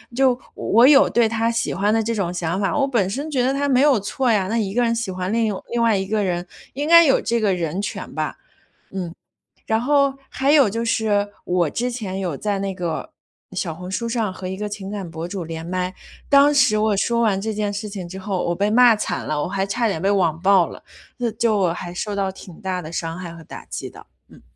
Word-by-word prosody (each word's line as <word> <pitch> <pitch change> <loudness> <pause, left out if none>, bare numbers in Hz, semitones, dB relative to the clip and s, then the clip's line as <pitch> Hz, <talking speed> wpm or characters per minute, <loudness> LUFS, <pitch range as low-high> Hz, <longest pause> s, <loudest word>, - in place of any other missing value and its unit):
就 255 -1 +3 0.2
我 235 +4 +4
有 285 0 +6
对 235 -1 +3
他 230 +1 0
喜 230 - -1
欢 205 +2 +1
的 225 - +2
这 230 +1 -2
种 180 -4 -1
想 175 +2 -2
法， 195 - 0
我 275 - +2
本 230 -9 +1
身 280 +9 -4
觉 265 -5 +1
得 260 +2 +2
它 285 +1 0
没 260 -1 +3
有 285 -6 +4
错 240 +5 0
呀， 195 -4 +2
那 225 +4 -1
一 200 -4 -1
个 245 - +2
人 230 -1 +2
喜 230 -4 -2
欢 185 +2 -3
另 230 0 +2
一 - - +1
个 205 - -2
外 - - -7
另 235 - +1
外 225 -3 +3
一 190 - -2
个 210 0 0
人， 175 -1 -2 0.3
应 285 +3 -3
该 335 +1 +9
有 270 - +4
这 235 0 0
个 205 -3 +2
人 175 +1 -2
权 205 - -5
吧， - - -3 0.5
嗯。 180 -3 -5 0.5
然 220 - +2
后 280 +1 +2 0.2
还 275 +2 +1
有 280 -8 +5
就 230 +3 -2
是， 215 -4 +1 0.2
我 180 -2 +1
之 245 +8 -2
前 210 -6 -4
有 175 -6 -2
在 205 -2 -1
那 195 0 -2
个 175 -3 -4 0.4
小 180 -3 -3
红 180 +3 -8
书 230 +4 -2
上 225 -4 -1
和 185 0 -8
一 190 - -4
个 210 +1 -4
情 200 -1 -7
感 200 -4 -5
博 165 +1 -5
主 180 0 -5
连 165 0 -6
麦， 180 +1 -2 0.4
当 285 +1 +6
时 255 -6 +4
我 215 -1 +2
说 235 +4 +1
完 210 -4 +2
这 220 +2 -2
件 205 -1 -1
事 205 +1 -4
情 195 -4 -6
之 190 - -8
后， 190 -1 -2
我 170 - 0
被 200 +4 0
骂 240 +1 +6
惨 210 - -3
了， 150 -1 -1
我 - - -2
还 195 +1 -1
差 230 +3 0
点 195 -6 -2
被 190 - +1
网 170 -5 +1
暴 190 -1 +4
了， - - -12 0.3
那 240 -2 0
就 220 -1 +1
我 180 -4 +2
还 175 -1 -6
受 205 +4 -4
到 195 -1 -1
挺 185 -2 -12
大 190 -3 -2
的 160 -1 -9
伤 165 0 -3
害 175 -2 -7
和 165 - -11
打 - - -10
击 - - -6
的， - - -14 0.2
嗯。 - - -17
205 Hz, 275 characters per minute, -21 LUFS, 185-235 Hz, 0.5 s, 该